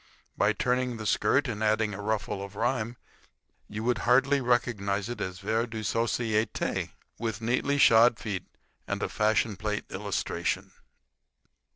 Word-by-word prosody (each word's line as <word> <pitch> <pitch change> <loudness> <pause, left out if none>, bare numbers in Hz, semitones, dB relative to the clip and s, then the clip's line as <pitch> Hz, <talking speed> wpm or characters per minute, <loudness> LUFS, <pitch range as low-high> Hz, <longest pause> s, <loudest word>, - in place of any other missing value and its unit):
By 100 +1 +3
turning 125 0 0
the 110 - -6
skirt 140 +6 +2
and 110 -3 -3
adding 110 0 +2
a 100 - -6
ruffle 105 -2 -2
of 100 +1 -9
rhyme 115 +1 -1 0.7
you 105 +1 -5
would 120 -1 +1
hardly 135 +4 +3
recognize 110 -5 0
it 120 - -5
as 90 0 -3
vers 110 +4 0
de 110 -1 -5
societe 115 0 0 0.3
with 110 -3 -2
neatly 125 +5 0
shod 115 -2 +6
feet 100 -6 -4 0.4
and - - -2
a - - -1
fashion 105 0 +1
plate 105 +2 -2
illustration. 100 +1 -2
110 Hz, 145 wpm, -28 LUFS, 105-120 Hz, 0.7 s, shod